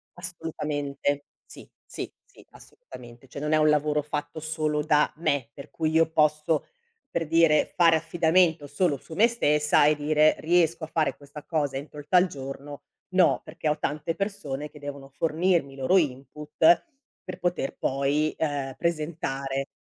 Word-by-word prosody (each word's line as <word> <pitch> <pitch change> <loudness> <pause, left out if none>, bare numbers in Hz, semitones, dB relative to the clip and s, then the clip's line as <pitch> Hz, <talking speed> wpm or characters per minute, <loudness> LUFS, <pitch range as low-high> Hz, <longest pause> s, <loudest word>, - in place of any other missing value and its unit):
Assolutamente. 150 -5 -3 0.2
Sì, - - -14 0.2
sì, - - -7
sì, - - -20
assolutamente. 120 - -14
Cioè 140 - -8
non 150 +1 -2
è - - +5
un 155 0 +4
lavoro 150 0 +2
fatto 150 +1 -5
solo 155 -1 -1
da 150 -1 +3
me, 140 -7 -1
per 140 - -11
cui 155 -1 -2
io 160 0 +3
posso, 155 0 +2 0.4
per 165 -8 -2
dire, 165 -1 +3
fare 170 -3 +5
affidamento 165 -1 +2
solo 145 +1 0
su 160 - -13
me 215 +8 +5
stessa 150 -11 +3
e 150 - +4
dire: 150 +1 +3
"Riesco 170 0 +2
a - - -13
fare 155 -4 0
questa 145 +1 -12
cosa 145 -5 -1
entro 150 +2 -8
il 180 +5 +3
giorno". 140 -1 -8 0.3
No, 185 -1 +3
perché 155 0 -4
ho 150 - 0
tante 150 +2 -2
persone 150 -9 -4
che 150 - -14
devono 140 -1 -8
fornirmi 160 0 0
i - - -13
loro 135 +8 +3
input 150 -1 -3 0.7
per 185 0 -8
poter 175 -6 -2
poi, 140 +3 0
ehm, 140 -4 -2
presentare 145 -5 -2
150 Hz, 155 wpm, -26 LUFS, 145-165 Hz, 0.7 s, è